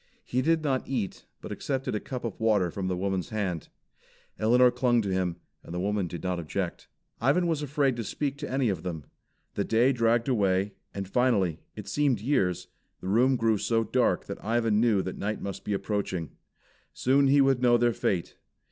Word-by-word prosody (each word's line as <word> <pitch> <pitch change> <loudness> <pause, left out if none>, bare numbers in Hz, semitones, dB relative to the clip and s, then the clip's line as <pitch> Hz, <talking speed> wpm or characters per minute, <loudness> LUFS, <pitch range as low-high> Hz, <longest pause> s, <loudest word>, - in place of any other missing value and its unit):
He 125 - 0
did 160 +2 +2
not 135 -3 0
eat, 120 -8 -3
but - - -8
accepted 135 -1 -2
a 105 - 0
cup 125 +2 -6
of' 115 -5 -5
water 105 -6 +2
from 95 +1 -3
the 90 -1 -1
woman's 95 -1 -2
hand. 95 -7 -2 0.7
Elinor 125 +3 +5
clung 125 -1 +2
to 100 - -2
him, 90 -2 0 0.3
and 85 - -8
the - - -2
woman 100 0 0
did 85 -1 -7
not 90 -1 -1
object. 85 +2 -4 0.3
Ivan 140 +9 +2
was 165 -3 0
afraid 140 -2 +1
to 115 - -2
speak 140 +6 -2
to 145 - -5
any 130 -2 +1
of 95 -5 -2
them. 80 -4 -5 0.5
The - - -1
day 120 +4 +3
dragged 115 0 +2
away, 100 -5 +1 0.2
and 100 -1 -5
finally 100 -8 +1 0.2
(it 105 -2 -8
seemed 140 -2 +1
years) 95 - 0 0.3
the 95 - -5
room 125 +6 +4
grew 115 -3 +2
so 115 +1 +1
dark 125 +2 +1
that - - -7
Ivan 115 -1 +2
knew 110 -5 +3
that 95 - -5
night 105 +2 -2
must 100 -1 -6
be 105 - -2
approaching. 95 - -2 0.6
Soon 135 +2 +3
he 140 +1 +5
would 135 -2 +3
know 120 -1 +5
their 120 0 +2
fate. 90 -4 -2
110 Hz, 195 wpm, -28 LUFS, 95-130 Hz, 0.7 s, Elinor